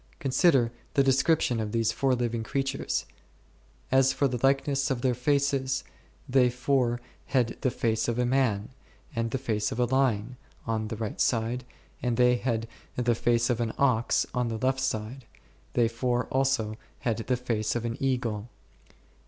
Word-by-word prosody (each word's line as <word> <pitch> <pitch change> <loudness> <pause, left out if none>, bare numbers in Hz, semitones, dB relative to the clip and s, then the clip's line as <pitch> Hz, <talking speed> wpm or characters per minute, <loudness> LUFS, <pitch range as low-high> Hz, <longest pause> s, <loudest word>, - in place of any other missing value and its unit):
Consider 130 - +3 0.2
the 140 - +5
descrip 135 +4 +3
tion 120 -2 0
of 105 -1 -3
these 115 -1 +2
four 135 -2 +1
living 120 -1 -1
creatures; 135 +4 -2 0.9
as 135 0 +5
for 140 - +2
the 125 -2 -3
likeness 140 +1 +2
of 130 -3 -1
their 130 -2 +3
faces, 135 +1 +1 0.4
they 125 -1 +4
four 125 -1 +1 0.3
had 125 -4 +1
the 130 - +2
face 115 -2 0
of 120 0 -1
a 125 - +2
man, 120 -5 +1 0.5
and 115 0 0
the 135 - -1
face 110 -5 -1
of 115 - -4
a 125 - +4
lion 125 -2 +1 0.3
on 110 -1 -1
the 110 - -4
right 110 -2 -3
side; 120 +1 0 0.4
and 120 -2 0
they 125 0 +5
four 120 - -12
had 115 0 -2 0.3
the 120 -1 +2
face 120 +1 +2
of 120 0 -1
an 115 -1 -1
ox 125 -4 +2
on 125 -1 0
the 115 -1 -2
left 130 +3 0
side; 120 +1 -3 0.5
they 120 -2 +3
four 120 +1 -1
also 130 -5 +1 0.2
had 115 -3 0
the 125 +2 -1
face 115 -4 -1
of 120 -1 -2
an 115 0 -2
eagle 120 -5 -1
s - - -31
125 Hz, 175 wpm, -28 LUFS, 115-130 Hz, 0.9 s, the